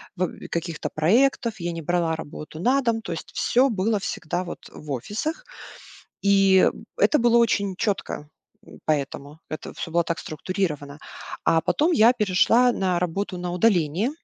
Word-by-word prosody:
в 185 - -1
э, - - -5
каких-то 170 -1 -3
проектов. 230 - +2
Я 175 0 -2
не 165 -1 -5
брала 170 0 0
работу 155 0 -8
на 255 +9 +3
дом. 230 -3 0
То 220 - -5
есть 165 - -8
всё 260 +3 +3
было 210 0 0
всегда 180 -3 -3
вот, 175 - -9
э, - - -22
в 150 -1 -8
офисах, 220 - -3 0.8
и, 195 -1 +5
э, - - -15 0.3
это 300 - +5
было 235 0 +4
очень 200 -5 +1
чётко, 195 -8 -2 0.4
м, - - -14
поэтому, 145 0 -2
это 155 - -6
всё 165 - -6
было 170 +1 +3
так 170 0 -2
структурировано. 155 -4 -4 0.5
А 165 - +4
потом 310 - +1
я 235 -6 +6
перешла 230 +3 +3
на 185 -5 0
работу 180 +2 -2
на 175 0 -4
удаление 180 - +2
185 Hz, 170 wpm, -24 LUFS, 165-225 Hz, 0.8 s, я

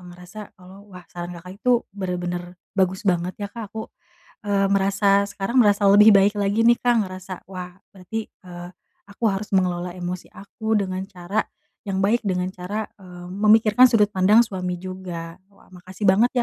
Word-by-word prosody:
ngerasa 180 +3 -13 0.2
kalau 190 +3 -15
wah 180 -2 -12
saran 175 0 -7
Kakak 180 +2 -10
itu 245 -1 +2
benar-benar 180 -2 -4 0.2
bagus 190 +2 0
banget 180 -1 0
ya 205 - -4
Kak 225 -4 -7
aku, 220 +2 -8 0.5
eee, 200 -1 +2
merasa 200 0 +2
sekarang 200 +5 -4
merasa 205 -1 +2
lebih 210 +2 +8
baik 200 +2 +4
lagi 205 +3 +1
nih 235 0 +5
Kak, 245 -1 +2
ngerasa 185 0 -9 0.2
wah 180 -1 -8 0.2
berarti, 210 +4 -6
eee, 175 -1 -11 0.4
aku 215 +3 -7
harus 200 +1 -3
mengelola 180 -2 0
emosi 180 0 -6
aku 220 +2 -3
dengan 185 -1 -3
cara 190 +3 -3 0.4
yang 190 - -2
baik, 230 +4 +2
dengan 180 -3 -1
cara, 200 +4 -4 0.2
eee, 180 -1 -11
memikirkan 215 +4 +5
sudut 210 -3 +2
pandang 205 +5 +5
suami 180 -3 -4
juga. 180 -2 -8
Wah 195 -1 -24
makasih 185 +3 -9
banget 205 +6 +4
190 Hz, 165 wpm, -22 LUFS, 180-210 Hz, 0.5 s, lebih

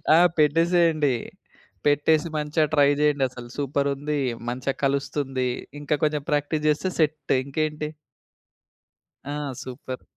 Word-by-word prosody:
ఆ! - - +7 0.2
పెట్టేసేయండి. 160 -2 +3 0.7
పెట్టేసి 150 +2 +3
మంచిగా 150 +1 +1
ట్రై 145 -2 +5
జేయండి. 145 -2 +2
అసలు 120 -1 -10
సూపర్ 140 0 0
ఉంది. 145 +1 -2 0.3
మంచిగా 130 +2 -2
కలుస్తుంది. 135 -2 -1 0.3
ఇంకా 150 +1 +1
కొంచెం 150 -1 +1
ప్రాక్టీస్ 150 +1 0
జేస్తే 150 +5 +1
సెట్ 150 -3 +1
ఇంకేంటి? 150 +2 -2 1.4
ఆ! 145 - -5 0.3
సూపర్. 130 0 -7
145 Hz, 110 wpm, -25 LUFS, 140-155 Hz, 1.4 s, ఆ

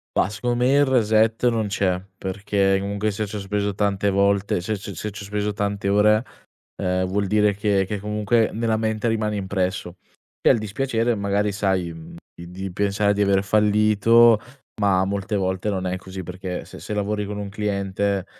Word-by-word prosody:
Bah, - - +3
secondo 120 +4 -2
me 130 - +3
il 145 +1 +5
reset 115 -2 +2
non 115 -3 +1
c'è, 95 -2 0 0.2
perché 100 +1 0
comunque 100 +2 -1
se 105 +2 -3
ci 105 +1 -6
ho - - -4
speso 100 +1 -2
tante 100 0 0
volte 100 0 +2
se 105 +5 -2
se 100 0 -7
se 105 +5 -5
ci 100 0 -9
ho - - -8
speso 105 +1 -2
tante 100 0 -2
ore, 105 +3 +4 0.5
ehm, 90 -1 0
vuol 100 +2 -1
dire 105 +1 +3
che 100 -1 +1
che 105 +1 -3
comunque 105 +2 +1
nella 115 0 0
mente 110 0 -1
rimane 110 -2 0
impresso. 95 -2 -2 0.5
E - - +4
al - - +5
dispiacere 115 +2 -1
magari 100 0 0
sai, 95 -4 0
mhmm, 80 -1 -11 0.2
di 85 0 -10
di 95 0 -6
pensare 100 +1 +1
di 100 - -1
aver 100 -1 +3
fallito, 105 +3 +4 0.4
ma 95 -2 +3
molte 100 +1 -2
volte 95 +1 -1
non 95 -2 -2
è 90 - -1
così, 95 0 -8
perché 90 +1 -6
se - - -11
se - - -5
lavori 105 0 -1
con 105 +1 -5
un 100 -1 -4
cliente, 100 -1 -2
100 Hz, 190 wpm, -23 LUFS, 95-105 Hz, 0.5 s, il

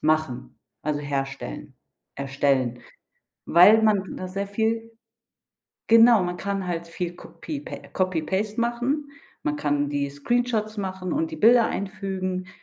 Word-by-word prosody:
machen, 155 -5 -1 0.2
also 150 -1 -1
herstellen 135 -2 -4 0.4
erstellen, 135 -3 0 0.7
weil 205 +6 +7
man 205 -3 +1
da 185 - -5
sehr 195 +2 -3
viel 225 +2 -1 1.0
Genau, 230 -2 +7
man 180 0 -3
kann 195 -2 -3
halt 170 -1 -3
viel 175 +1 -4
kopie 150 -3 -7 0.3
Copy 185 -3 0
Paste 205 +7 -1
machen. 245 +5 -1 0.3
Man 300 0 -1
kann 145 - 0
die 140 -1 -1
Screenshots 215 - -1
machen 190 -2 -4
und 320 +2 -1
die - - -4
Bilder 235 -2 +6
einfügen. 190 -2 -3
190 Hz, 130 wpm, -25 LUFS, 155-220 Hz, 1.0 s, weil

